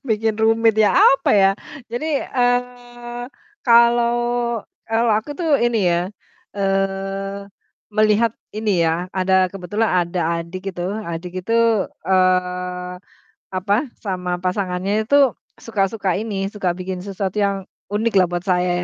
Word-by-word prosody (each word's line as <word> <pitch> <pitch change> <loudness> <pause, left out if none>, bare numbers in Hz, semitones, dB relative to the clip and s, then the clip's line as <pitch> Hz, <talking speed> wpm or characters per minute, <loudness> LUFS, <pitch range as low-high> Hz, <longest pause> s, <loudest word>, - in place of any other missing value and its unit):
Bikin 220 0 +1
rumit 225 0 +3
ya, 215 -2 +4
apa 275 0 +5
ya? 195 -2 +5 0.4
Jadi, 285 +5 -1
eee, 245 -1 -2 0.4
kalau 235 0 +5 0.7
kalau 225 +1 +1
aku 220 +7 -8
tuh 315 -5 +2
ini 230 -6 +2
ya, 170 0 +2 0.5
eee, 195 0 -1 0.5
melihat 215 +1 +3 0.2
ini 210 -5 +1
ya, 165 +2 0
ada 190 0 +3
kebetulan 200 +4 -2 0.2
ada 175 +1 -3 0.2
adik 185 +4 -6
itu 175 - -4 0.2
adik 170 +1 -5
itu, 225 - -2 0.5
eee, 180 -1 +1 0.6
apa, 185 +2 0 0.3
sama 180 -3 -2
pasangannya 190 +3 -1
itu 280 0 +4 0.3
suka 210 -4 0
suka 195 -5 -1
ini, 200 -3 -2
suka 190 -4 0
bikin 185 0 -4
sesuatu 195 0 -4
yang 200 -1 +2 0.3
unik 220 +2 0
lah 180 - +4
buat 175 0 -3
saya 180 -1 +1
200 Hz, 125 wpm, -20 LUFS, 185-225 Hz, 0.7 s, apa